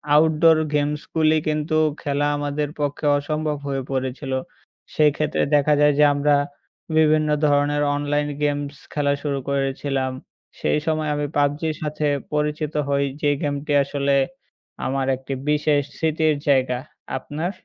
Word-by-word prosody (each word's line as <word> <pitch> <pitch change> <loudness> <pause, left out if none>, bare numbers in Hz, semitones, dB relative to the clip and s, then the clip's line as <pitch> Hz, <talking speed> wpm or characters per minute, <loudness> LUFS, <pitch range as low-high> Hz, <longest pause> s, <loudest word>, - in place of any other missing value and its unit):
Outdoor 160 +1 +5 0.2
গেমসগুলি 150 +2 +1
কিন্তু 155 +1 -1 0.3
খেলা 145 0 0
আমাদের 145 0 -2
পক্ষে 145 +1 -2
অসম্ভব 150 +1 -2
হয়ে 135 -1 -1
পড়েছিল। 130 +1 -3 0.6
সেই 150 -1 +5
ক্ষেত্রে 155 0 0
দেখা 150 +1 +4
যায় 150 0 +5
যে - - +7
আমরা, 145 0 +3 0.6
বিভিন্ন 155 -1 +4 0.2
ধরনের 145 0 +2
অনলাইন 145 0 0
গেমস 145 -1 -1 0.2
খেলা 145 -1 +1
শুরু 140 -2 -1
করেছিলাম, 135 -1 -1 0.5
সেই 150 - +1
সময় 155 -1 0
আমি 145 0 -1
PUBG-র 145 +2 +1
সাথে 150 0 -1 0.3
পরিচিত 150 0 -1
হই, 140 0 +1 0.2
যে 145 - +2
গেমটি 145 0 -2
আসলে 140 0 0 0.7
আমার 135 0 0
একটি 135 +1 -6 0.2
বিশেষ 150 -1 +2 0.2
স্মৃতির 155 -1 +1
জায়গা। 130 -3 +2 0.4
আপনার? 155 +7 -4
145 Hz, 130 wpm, -22 LUFS, 140-150 Hz, 0.7 s, যে